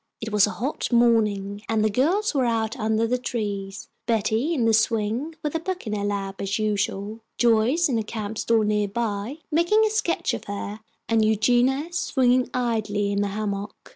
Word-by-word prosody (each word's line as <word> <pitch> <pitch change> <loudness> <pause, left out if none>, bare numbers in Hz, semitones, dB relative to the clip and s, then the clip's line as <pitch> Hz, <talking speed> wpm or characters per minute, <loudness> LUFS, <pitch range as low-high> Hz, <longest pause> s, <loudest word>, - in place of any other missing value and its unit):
It 220 0 -5
was 210 -1 +4
a - - -6
hot 260 +5 -3
morning, 210 -4 +2
and 220 -1 +2
the - - +3
girls 350 - +1
were 265 -3 +2
out 225 -1 0
under 220 +1 +1
the 250 +2 0
trees: 205 -5 -4 0.2
Betty 225 +5 +1
in 265 -9 +1
the 225 - +3
swing, 225 +7 0
with 300 - -2
a 325 - 0
book 370 0 -4
in 215 - -3
her 205 -1 -2
lap, 200 -1 -3
as 195 0 -1
usual, 210 0 -2 0.2
Joyce 240 +8 +3
on 245 -5 0
a - - -2
camp 215 0 -5
stool 230 -1 +2
near 210 -1 +1
by, 220 +4 -3
making 345 +8 +3
a 430 - 0
sketch 420 -6 0
of - - -5
her, 205 +1 -5 0.3
and 225 -1 +3
Eugenia 245 +8 +2
swinging 255 -5 +2
idly 215 -5 -1
in 200 0 +1
a - - 0
hammock. 200 0 -3
220 Hz, 190 wpm, -24 LUFS, 205-250 Hz, 0.3 s, was